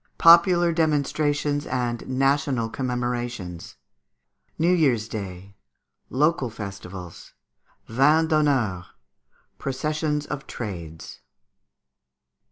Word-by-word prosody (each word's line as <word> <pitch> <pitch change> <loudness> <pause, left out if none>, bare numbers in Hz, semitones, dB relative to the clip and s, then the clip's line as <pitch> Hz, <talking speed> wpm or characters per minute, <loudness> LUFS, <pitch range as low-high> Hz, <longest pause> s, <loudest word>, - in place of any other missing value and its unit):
Popular 170 0 +6
Demonstrations 150 -2 0
and 120 -2 -2
National 135 -2 +1
Commemorations. 120 -8 -4 0.8
New 170 +3 +3
Year's 130 -11 +2
Day. 100 -3 -7 0.6
Local 150 -1 +1
Festivals. 95 -4 -9 0.5
Vins 150 +7 +3
d'Honneur. 130 - +1 0.7
Processions 150 +2 -2
of 140 - -6
Trades. 85 -8 -7
130 Hz, 70 wpm, -24 LUFS, 110-150 Hz, 0.8 s, Popular